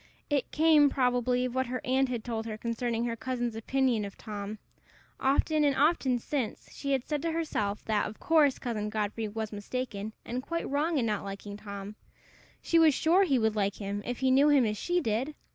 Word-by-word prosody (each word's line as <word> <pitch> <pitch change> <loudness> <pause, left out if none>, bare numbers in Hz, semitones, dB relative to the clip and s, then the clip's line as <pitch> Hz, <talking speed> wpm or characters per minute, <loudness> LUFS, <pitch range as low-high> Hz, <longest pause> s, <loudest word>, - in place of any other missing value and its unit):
It 280 -4 +1
came, 305 -2 +5
probably, 250 -1 +1
of 250 - -3
what 260 0 0
her 255 +1 -3
aunt 265 +1 +2
had 240 -3 -3
told 225 -2 -3
her 215 -1 -4
concerning 235 +1 -2
her 230 -1 -2
cousin's 240 -1 -3
opinion 245 0 +1
of 200 -1 -7
Tom. 210 -1 -6 0.6
Often 300 +3 +2
and 285 -2 +3
often 280 -4 +3
since, 245 -1 -4
she 280 - -4
had 260 -2 -1
said 300 -2 -1
to 330 - -1
herself 215 -11 -2
that, 215 -2 +1
of 215 - -12
course, 305 -5 +4
Cousin 215 -4 -3
Godfrey 215 +1 -2
was 220 +1 -4
mistaken 215 0 -4
and 245 +2 -3
quite 335 +5 -3
wrong 305 +3 0
in 250 - +1
not 210 -2 -1
liking 200 +1 -7
Tom; 200 0 -8 0.7
she 335 - +3
was 315 -4 +6
sure 355 +7 +4
he 275 -7 +2
would 220 -2 +1
like 200 -1 0
him 200 0 -4
if 245 +3 -4
he 260 0 +3
knew 280 +3 +5
him 280 -4 +5
as 210 -1 0
she 350 - 0
did! 255 +4 -1
245 Hz, 205 wpm, -29 LUFS, 215-280 Hz, 0.7 s, was